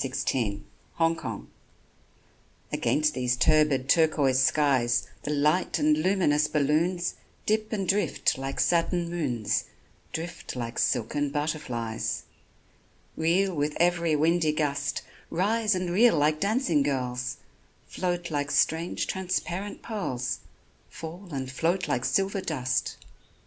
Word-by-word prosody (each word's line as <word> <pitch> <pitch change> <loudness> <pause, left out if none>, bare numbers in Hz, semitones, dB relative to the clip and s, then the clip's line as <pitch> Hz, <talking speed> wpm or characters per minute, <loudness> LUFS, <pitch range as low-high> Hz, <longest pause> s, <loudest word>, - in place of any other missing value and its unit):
LES 135 -1 -3 0.7
BALLONS 165 0 -1 1.3
AGAINST 150 0 +1
these 125 -2 0
turbid 150 -1 +3
turquoise 145 -4 +3
skies 130 -4 +2
The - - -5
light 150 +6 +2
and 150 -1 +3
luminous 155 -3 +2
balloons 165 +5 +1 0.3
Dip 215 0 0
and 195 -4 -2
drift 205 +1 +1
like 135 +1 -5
satin 170 0 +1
moons 125 -11 -1 0.5
Drift 170 -2 -5
like 120 -1 -4
silken 140 +4 0
butterflies; 140 -7 -2 0.9
Reel 180 +4 +2
with 150 -1 -1
every 170 -2 +2
windy 160 +1 +2
gust, 150 -2 -1 0.3
Rise 210 +4 +1
and 180 -1 -2
reel 215 0 +5
like 150 +1 +2
dancing 200 - +2
girls, 125 -3 -2 0.5
Float 175 -2 -3
like 145 -1 -1
strange 165 +3 +1
transparent 190 +1 -3
pearls, 130 - -3 0.5
Fall 170 +4 -8
and 130 -2 -4
float 170 +7 0
like 125 0 0
silver 195 0 +1
dust. 130 -7 -1
155 Hz, 115 wpm, -27 LUFS, 140-175 Hz, 1.3 s, reel